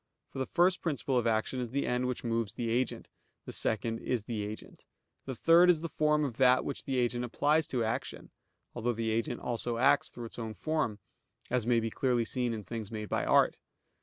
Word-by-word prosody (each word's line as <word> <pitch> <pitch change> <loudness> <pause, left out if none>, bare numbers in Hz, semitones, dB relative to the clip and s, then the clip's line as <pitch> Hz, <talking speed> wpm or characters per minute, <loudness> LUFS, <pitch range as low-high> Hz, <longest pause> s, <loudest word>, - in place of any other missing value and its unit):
For - - -6
the 130 - -1
first 180 +1 +3
principle 140 -4 -1
of 120 - -1
action 110 +3 0
is 125 -2 -3
the 140 +4 -1
end 125 +1 0
which 125 - -3
moves 115 -3 -1
the 115 0 -2
agent; 125 +1 -1 0.4
the - - -7
second 115 +1 -1
is 120 -3 -2
the 110 -1 -3
agent; 105 +1 -8 0.4
the 130 - -4
third 170 +6 +6
is 165 -3 +4
the 165 - -4
form 150 -1 +3
of 125 -5 -5
that 130 -1 +4
which 140 - -5
the 135 -1 -1
agent 120 0 0
applies 150 +6 +1
to 125 -3 -1
action 110 - -4 0.4
(although 120 0 -1
the 110 0 -1
agent 115 +2 -1
also 120 -1 -2
acts 140 +4 +3
through 120 - -8
its 115 - -9
own 110 -2 -5
form); 155 -9 -1 0.5
as 120 -2 +1
may 120 -1 +4
be 115 0 -2
clearly 120 -2 +1
seen 125 +1 0
in 110 -2 -4
things 110 +1 -6
made 110 -2 -5
by - - 0
art. - - +4
120 Hz, 215 wpm, -31 LUFS, 115-135 Hz, 0.5 s, third